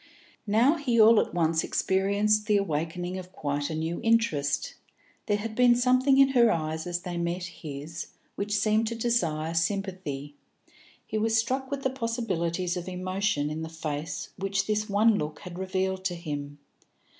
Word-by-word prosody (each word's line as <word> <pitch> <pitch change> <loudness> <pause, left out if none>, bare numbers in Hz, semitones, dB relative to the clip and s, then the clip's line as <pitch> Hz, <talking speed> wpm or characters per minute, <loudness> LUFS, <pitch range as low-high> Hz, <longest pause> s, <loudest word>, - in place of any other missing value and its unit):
Now 235 +10 +4
he 250 -6 +1
all 220 0 +8
at - - 0
once 165 -2 +1
experienced 205 +3 +1
the 210 -2 +4
awakening 175 +1 -2
of 185 0 -10
quite 145 -5 -2
a 160 - -3
new 160 +2 -2
interest; 155 -12 +1 0.5
there 205 -2 +2
had 220 +1 -5
been 245 +1 +5
something 255 +2 +3
in 275 0 +6
her 240 -4 +5
eyes 160 -1 -2
as 175 0 -2
they 175 -2 -5
met 170 +1 -2
his 160 -2 -7 0.3
which 205 +1 -1
seemed 215 +1 +2
to 230 - -3
desire 170 -10 0
sympathy; 170 -5 -2 0.7
he 215 - -2
was 225 +1 +2
struck 260 +4 0
with 275 -1 -4
the 265 - +1
possibilities 190 -8 -2
of 180 0 -5
emotion 185 -4 -1
in 155 +1 -4
the 160 - -5
face 155 -1 -4
which 195 0 0
this 215 0 -1
one 210 +1 +4
look 150 0 -5
had 180 0 -8
revealed 190 0 -1
to 180 -2 0
him. 145 -4 -5
190 Hz, 170 wpm, -27 LUFS, 160-220 Hz, 0.7 s, all